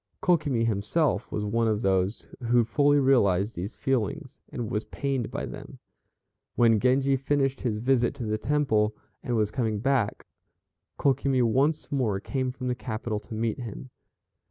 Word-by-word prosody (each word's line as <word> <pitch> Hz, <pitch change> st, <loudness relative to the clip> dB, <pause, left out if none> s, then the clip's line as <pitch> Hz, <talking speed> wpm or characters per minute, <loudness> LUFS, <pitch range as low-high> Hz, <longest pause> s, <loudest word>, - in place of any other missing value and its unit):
Kokimi 145 Hz, -10 st, +2 dB
himself 115 Hz, +4 st, 0 dB
was 105 Hz, -, -2 dB
one 115 Hz, +2 st, +1 dB
of 110 Hz, 0 st, 0 dB
those 95 Hz, +2 st, 0 dB, 0.2 s
who 120 Hz, 0 st, +5 dB
fully 145 Hz, +5 st, +3 dB
realized 110 Hz, -7 st, +3 dB
these 95 Hz, +6 st, -5 dB
feelings, 135 Hz, +2 st, -2 dB
and 120 Hz, -1 st, -4 dB
was 110 Hz, -2 st, -1 dB
pained 135 Hz, -5 st, -2 dB
by -, -, -4 dB
them. -, -, -9 dB, 0.8 s
When 115 Hz, -2 st, +4 dB
Genji 135 Hz, +3 st, +3 dB
finished 135 Hz, 0 st, 0 dB
his 115 Hz, -4 st, -1 dB
visit 120 Hz, +1 st, +1 dB
to 125 Hz, -, -6 dB
the 110 Hz, 0 st, -1 dB
Temple, 110 Hz, -7 st, +1 dB, 0.3 s
and 120 Hz, -, -2 dB
was 105 Hz, -2 st, +1 dB
coming 110 Hz, -3 st, -1 dB
back, 130 Hz, -1 st, 0 dB, 0.7 s
Kokimi 135 Hz, -1 st, +2 dB
once 135 Hz, +7 st, +1 dB
more 120 Hz, -8 st, 0 dB
came 130 Hz, +4 st, -2 dB
from 130 Hz, 0 st, -6 dB
the 125 Hz, -, +1 dB
capital 110 Hz, -3 st, -4 dB
to 105 Hz, +2 st, -9 dB
meet 115 Hz, +3 st, -1 dB
him. 125 Hz, +2 st, -7 dB
120 Hz, 155 wpm, -27 LUFS, 110-135 Hz, 0.8 s, who